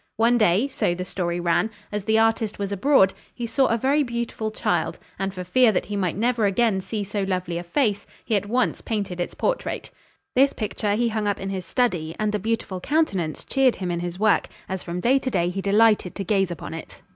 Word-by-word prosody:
One 235 +2 +4
day, 215 +4 +3
so 175 -10 0
the 180 +1 -4
story 175 -2 -2
ran, 175 +5 +1 0.2
as 205 -1 -3
the 220 +1 +3
artist 225 -1 +2
was 200 -1 -3
abroad, 200 -1 +4 0.2
he 240 - -4
saw 250 +3 +2
a 230 - +1
very 275 +5 +2
beautiful 235 -4 -2
child, 215 - -1 0.2
and 195 0 -1
for 185 -1 -6
fear 235 +6 +4
that 185 - -1
he 205 +3 -4
might 185 -3 -1
never 235 -1 +2
again 200 -1 +2
see 210 +2 -3
so 205 +1 -3
lovely 185 -3 -2
a - - -6
face, 205 +1 0 0.2
he 220 - +1
at 200 0 0
once 245 +3 0
painted 200 -5 -3
its - - -4
portrait. - - -2 0.4
This 270 +2 +5
picture 210 -1 -1
he 235 +2 +1
hung 215 -1 -1
up 205 - 0
in 195 0 -4
his 185 -2 -4
study, 175 -11 0
and 215 -1 0
the 210 - -1
beautiful 215 -3 -2
countenance 190 - 0
cheered 270 -3 +3
him 180 -2 -3
in 170 - -1
his 175 0 -4
work, 215 +1 +3 0.2
as 190 -1 -3
from 175 +1 -4
day 260 +6 +4
to 265 - -2
day 175 -6 +1
he 195 +2 -3
delighted 210 -1 +3
to 200 - -3
gaze 195 -1 +1
upon 170 -2 -6
it. 165 - -9
205 Hz, 225 wpm, -24 LUFS, 185-230 Hz, 0.4 s, This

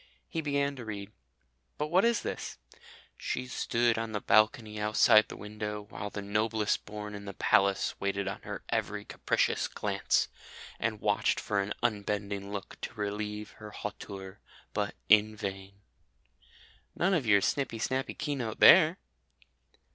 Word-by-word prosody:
He 165 - -3
began 140 -1 0
to 120 - -6
read. 105 -1 -6 0.7
But 150 +1 -2
what 180 +4 +4
is 235 -1 +2
this? - - -5 0.6
"She 130 - -2
stood 120 -2 +1
on 115 -1 -4
the 105 - 0
balcony 110 0 +3
outside 110 0 +5
the - - -9
window, 105 0 -5
while 100 - -5
the 100 0 -6
noblest 105 +1 0
born 105 0 -7
in 100 0 -7
the 100 -2 -7
palace 100 +2 +3
waited 100 0 -1
on 100 - -4
her - - -7
every - - -2
capricious - - 0
glance, - - 0 0.5
and 110 -1 -1
watched 105 -1 +2
for 100 -2 -1
an 100 +1 -3
unbending 100 -3 -1
look 100 -2 -7
to - - -6
relieve 105 +1 -4
her 105 -1 -9
hauteur, 100 -2 -7 0.3
but - - -1
in 110 0 +5
vain." 100 -1 -6 1.1
None 190 +3 +2
of 150 -10 +1
your 100 -2 +6
snippy 135 -2 0
snappy 130 +4 -2
Keynote 135 -7 -3
there! 165 - +8
105 Hz, 145 wpm, -30 LUFS, 100-115 Hz, 1.1 s, there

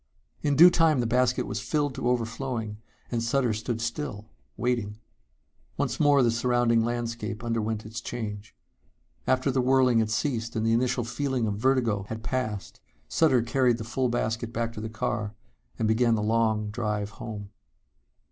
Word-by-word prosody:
In 145 -1 +1
due 175 +5 +9
time 160 -5 +3
the 120 - +1
basket 125 +1 +2
was - - -3
filled 145 -3 -1
to 120 - -1
overflowing 115 -2 -2 0.3
and 120 -2 0
Sutter 120 0 +1
stood 110 +2 -3
still, 115 -3 -4 0.3
waiting. 115 -4 -1 0.8
Once - - -1
more 145 -3 +5
the 120 - +3
surrounding 120 -1 +2
landscape 115 -2 -3
underwent 110 -2 -2
its 110 +2 -6
change. 105 -3 -6 0.7
After 130 +1 +2
the 130 0 +1
whirling 130 -2 +4
had 110 -1 +1
ceased 115 0 -1
and 110 0 0
the 115 - +3
initial 120 +1 +1
feeling 130 +1 -1
of 100 -2 -2
vertigo 120 -6 +1
had 110 0 -5
passed 120 -5 -3 0.3
Sutter 135 -7 +3
carried 125 0 +2
the 115 - -5
full 125 +3 -1
basket 115 -1 -1
back 115 0 -2
to 110 - -6
the 110 - -4
car 110 -1 -3 0.4
and 110 - 0
began 115 +1 +3
the 105 - -1
long 110 -1 +1
drive 105 -2 -2
home. 105 -3 -6
115 Hz, 165 wpm, -27 LUFS, 110-125 Hz, 0.8 s, due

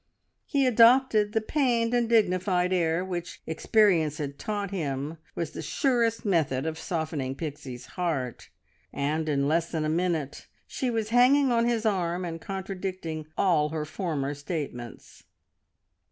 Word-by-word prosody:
He 280 -3 +2
adopted 230 -3 +5
the 220 - +2
pained 235 -2 +1
and 240 -2 +2
dignified 185 -4 +2
air 170 0 +1
which 175 -2 -5
experience 160 -3 +2
had 140 -2 -5
taught 205 -3 -3
him 150 -3 -3 0.2
was 165 -3 -3
the - - -6
surest 230 - 0
method 155 -8 +1
of 160 0 -3
softening 155 -6 -3
Pixie's 140 -5 -6
heart, 150 -9 -3 0.4
and 155 +3 -1
in 140 -1 +1
less 165 +2 +1
than 160 -2 -1
a - - 0
minute 165 -4 -1 0.2
she 260 - -2
was 225 -2 -1
hanging 255 +3 +5
on 235 0 +3
his 235 -2 0
arm 180 -3 0
and 165 -1 -5
contradicting 185 -5 -5
all 160 -6 +3
her 155 0 -3
former 150 -4 -3
statements. 145 -6 -6
175 Hz, 140 wpm, -27 LUFS, 155-215 Hz, 0.4 s, adopted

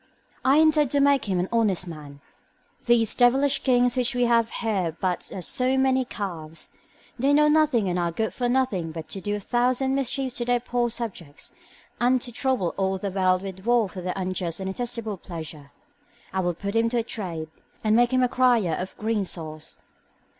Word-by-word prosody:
I 270 +2 +4
intend 310 -3 +4
to 285 - +3
make 280 -1 +3
him 190 -3 0
an 180 - 0
honest 215 -6 +1
man. 150 -4 -10 0.7
These 230 -2 +4
devilish 270 +3 +3
kings 245 -1 +3
which 250 0 0
we 245 - +2
have 230 -1 +3
here 225 - -3 0.2
are 165 - -1
but 180 +2 -3
as 185 -3 -5
so 255 +1 +1
many 265 -1 +2
calves; 165 -8 -6 0.5
they 275 +3 +3
know 300 +1 +5
nothing 300 -9 +3
and 180 0 0
are 170 -1 0
good 220 +6 -2
for 245 -1 -1
nothing 240 -11 0
but 160 -1 -7
to 195 - -5
do 205 +2 -2
a - - -3
thousand 250 +5 +1
mischiefs 270 -1 -1
to 240 - -2
their 245 0 +2
poor 240 0 -1
subjects, 200 - -5 0.4
and 250 +2 +3
to 245 - -5
trouble 245 -7 0
all 190 0 0
the 195 +1 -4
world 185 -1 +2
with 190 -1 -6
war 235 -1 +3
for 185 0 -8
their 180 0 -2
unjust 185 -3 -2
and 190 0 -3
detestable 230 -3 -4
pleasure. 160 -5 -9 0.6
I 190 - 0
will 175 -2 0
put 200 +4 -5
him 230 0 +3
to 240 - -1
a 230 - +1
trade, 170 -9 -5 0.3
and 215 0 +3
make 240 +1 +4
him 255 0 +3
a - - +4
crier 245 -8 +2
of 185 - -6
green 220 -1 0
sauce. 155 -4 -6
225 Hz, 200 wpm, -25 LUFS, 185-250 Hz, 0.7 s, know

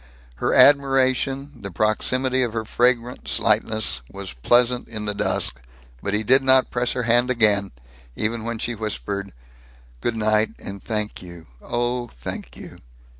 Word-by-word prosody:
Her - - 0
admiration, 135 0 +3
the 100 - -5
proximity 130 +7 +1
of 120 -3 -1
her 110 -1 -3
fragrant 120 +1 0
slightness, 110 - +1
was 100 -5 -7
pleasant 120 - +2
in 110 -2 -6
the 105 - -1
dusk, 65 -10 0 0.4
but 100 +1 -2
he 105 - -1
did 130 +5 +4
not 130 -1 +4
press 120 0 0
her 125 - -2
hand 120 +2 +2
again, 105 -5 +2 0.4
even 110 +1 -2
when 115 0 -4
she 120 +2 -3
whispered, 100 - -4 0.7
"Good 120 - -1
night, 110 0 +1
and 100 0 -8
thank 105 -2 -3
you 85 -2 -11 0.2
oh, 120 0 -2
thank - - -8
you." - - -11
115 Hz, 150 wpm, -22 LUFS, 105-125 Hz, 0.7 s, did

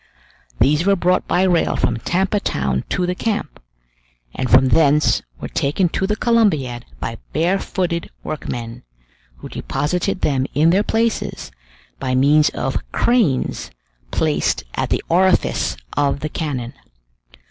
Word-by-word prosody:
These 145 +6 +3
were 200 - +5
brought 180 0 +1
by 180 - +2
rail 175 -3 +2
from 115 - 0
Tampa 190 - 0
Town 65 - -1
to 180 - 0
the 180 - -1
camp, 205 -4 -3 0.7
and 130 -1 -3
from 130 +1 +6
thence 150 +1 +3 0.2
were - - -5
taken 165 +6 0
to 190 - -1
the 210 - 0
Columbiad 180 - +1
by 115 0 -5
barefooted 175 +1 -1
workmen, 120 -6 -5 0.6
who - - -9
deposited 180 +5 -2
them 135 -2 +1
in 155 +4 +4
their 190 +3 +3
places 225 - -1 0.5
by 130 -1 -1
means 145 +3 +4
of - - -2
cranes 220 - +1 0.4
placed - - 0
at - - -2
the - - 0
orifice 185 +2 +2 0.2
of 140 -1 +1
the 155 - -3
cannon. 135 -6 -4
155 Hz, 135 wpm, -20 LUFS, 130-190 Hz, 0.7 s, from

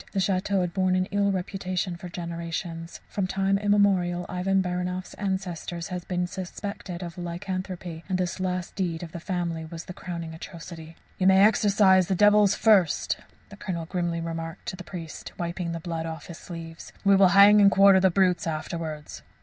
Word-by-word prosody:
The 195 - 0
château 190 +1 +1
had 175 -1 -2
borne 185 -1 +2
an 185 0 +1
ill 200 0 +2
reputation 185 -1 -2
for 175 +1 -8
generations. 170 -1 -5
From 195 -2 -2
time 195 +1 +1
immemorial 195 -4 +2
Ivan 190 +2 0
Baranoff's 180 0 -2
ancestors 180 -3 -4
had 180 -1 -5
been 180 -1 0
suspected 185 0 -6
of 170 0 -7
lycanthropy, 175 -1 -5
and 185 - +1
this 180 0 -2
last 185 -1 -2
deed 175 -3 -2
of 165 - -8
the 170 - -6
family 170 -2 -3
was 165 +1 -8
their 185 - -8
crowning 170 -3 -6
atrocity. 165 0 -9 0.2
"You 185 - +3
may 190 0 +6
exorcize 200 -3 +4
the 190 - +1
devils 205 +1 +5
first," 200 -8 +3 0.3
the 200 - -12
Colonel 170 -4 -4
grimly 175 -1 -2
remarked 165 0 -5
to - - -5
the 180 - -9
priest, 170 -3 -8
wiping 170 0 -3
the 165 - -4
blood 165 -1 -4
off 160 -2 -6
his 170 - -9
sleeves. 165 -2 -9
"We 200 0 +6
will 195 -1 +6
hang 205 +1 +8
and 200 - +8
quarter 195 -1 +6
the 190 0 +4
brutes 180 -2 +2
afterwards." 155 -1 -5
180 Hz, 180 wpm, -26 LUFS, 170-190 Hz, 0.3 s, hang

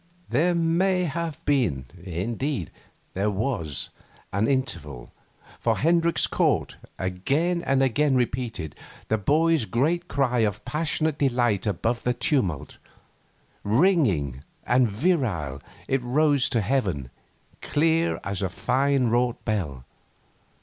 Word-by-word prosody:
There 165 +9 +2
may 180 +3 +2
have 165 -1 -4
been 115 - +1 0.2
indeed, 100 - -3 0.4
there 100 +3 0
was 100 - -2 0.4
an 100 +3 +1
interval, 85 - -2 0.5
for 115 -2 +1
Hendricks 170 +2 +2
caught, - - +1 0.2
again 140 - 0
and 135 -4 +2
again 135 +2 +2
repeated, 120 - -2 0.4
the 110 - +1
boy's 155 +4 +2
great 160 +11 0
cry 130 -6 +1
of 105 -2 0
passionate 155 0 -1
delight 120 -7 +1
above 115 +5 -1
the 125 0 0
tumult. 115 - -1 0.8
Ringing 105 - +2 0.2
and 125 -1 +3
virile 105 - 0 0.3
it 135 -1 +1
rose 140 +2 +2
to 115 - +1
heaven, 95 - -1 0.5
clear 165 +2 +1
as 100 -1 -3
a 95 - 0
fine 135 +5 +1
wrought 120 0 0
bell. 75 - -2
125 Hz, 115 wpm, -25 LUFS, 100-150 Hz, 0.8 s, and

